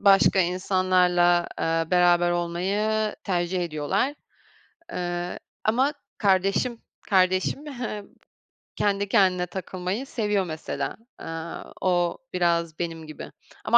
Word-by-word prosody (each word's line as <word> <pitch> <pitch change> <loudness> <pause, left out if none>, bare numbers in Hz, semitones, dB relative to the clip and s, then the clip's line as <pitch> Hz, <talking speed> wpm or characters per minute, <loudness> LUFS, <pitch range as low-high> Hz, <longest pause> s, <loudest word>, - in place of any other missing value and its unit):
başka 195 -1 +5
insanlarla, 180 -1 +3
eee, 165 0 0
beraber 175 -1 +4
olmayı 200 +5 0
tercih 180 -1 0
ediyorlar. 170 - 0 0.8
Eee, 175 0 -3 0.3
ama 255 +7 +3 0.3
kardeşim, 195 +4 +2 0.3
kardeşim 185 +9 +2
he 240 -7 -5 0.7
kendi 200 0 +1
kendine 185 -4 +3
takılmayı 185 +5 -4
seviyor 210 -7 0
mesela. 160 -1 -4 0.2
Eee, - - -7 0.6
o 175 -2 +1 0.2
biraz 170 -3 +1
benim 165 -2 -4
gibi 155 - -9 0.3
ama - - +7
185 Hz, 100 wpm, -25 LUFS, 175-200 Hz, 0.8 s, ama